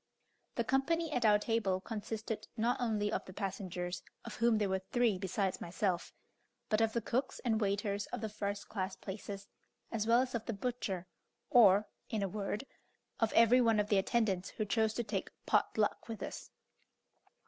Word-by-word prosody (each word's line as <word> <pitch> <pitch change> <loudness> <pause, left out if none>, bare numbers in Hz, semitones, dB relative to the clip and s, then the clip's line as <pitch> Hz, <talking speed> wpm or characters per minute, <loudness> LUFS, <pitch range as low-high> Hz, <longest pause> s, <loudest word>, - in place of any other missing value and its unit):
The 235 - +1
company 310 +7 +1
at 245 -5 +1
our 210 -1 +7
table 210 -3 0
consisted 215 +1 -4
not 240 +3 +1
only 210 -3 +1
of - - -1
the 185 - -10
passengers, 185 -3 -3 0.2
of 235 - -7
whom 230 -1 +4
there 210 -1 +1
were 190 0 0
three 235 -6 +3
besides 190 0 -1
myself, 180 0 -1 0.6
but 215 0 +3
of 225 -1 +2
the 235 - -1
cooks 260 +5 -1
and 225 -2 +2
waiters 200 0 0
of - - -5
the 220 - -1
first 205 -1 -4
class 190 -2 -3
places, 200 0 -7 0.4
as 220 -1 -1
well 235 +2 +6
as 255 -1 -2
of 230 -2 -3
the 230 - -1
butcher; 200 -5 -3 0.5
or, 210 -5 +7 0.2
in 215 -2 -1
a - - +1
word, 205 +5 -3 0.5
of 225 -1 +2
every 230 +2 +6
one 225 -3 +4
of 210 0 0
the 200 - +4
attendants 195 -3 +1
who 215 - -3
chose 220 +1 +1
to 240 - 0
take 205 -3 -3 0.2
"pot - - +2
luck" - - +1
with 225 -2 -5
us. - - -6
215 Hz, 180 wpm, -34 LUFS, 200-230 Hz, 0.6 s, our